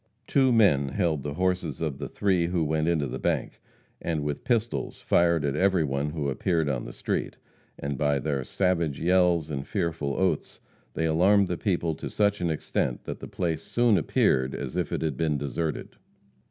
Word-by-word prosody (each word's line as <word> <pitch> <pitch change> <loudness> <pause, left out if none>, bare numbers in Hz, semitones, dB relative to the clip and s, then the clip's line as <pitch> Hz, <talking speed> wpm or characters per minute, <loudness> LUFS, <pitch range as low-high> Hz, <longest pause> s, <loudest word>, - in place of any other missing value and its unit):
Two 130 0 +3
men 95 - +4
held 80 0 0
the 70 +1 -5
horses 90 -5 -1
of 75 -4 -3
the - - -4
three 95 -4 +1
who 85 -2 0
went 80 +1 0
into 80 -4 +1
the 65 - -5
bank, - - -2 0.4
and 80 -3 -2
with 75 -1 -3
pistols 115 -2 -1
fired 85 -3 +2
at 70 -1 0
every 95 0 +3
one 70 +1 -1
who 75 -2 -3
appeared 80 +3 0
on 65 -4 -2
the - - -7
street; - - -3 0.4
and 70 -1 -4
by 75 -1 +2
their 70 -1 -1
savage 85 -3 0
yells 85 -3 +2
and 70 -2 -4
fearful 80 -4 -2
oaths 95 -5 -1 0.4
they 80 - 0
alarmed 95 +5 +4
the 90 - -1
people 85 -4 0
to - - -6
such 100 -2 +1
an 85 - +1
extent 75 -5 -2
that - - -6
the - - -7
place 80 -3 -2
soon 120 +4 +2
appeared 65 -5 +2
as 65 -2 -5
if - - -1
it - - -2
had 75 -5 -1
been 75 -1 +1
deserted. 75 +2 -3
80 Hz, 190 wpm, -27 LUFS, 70-90 Hz, 0.4 s, men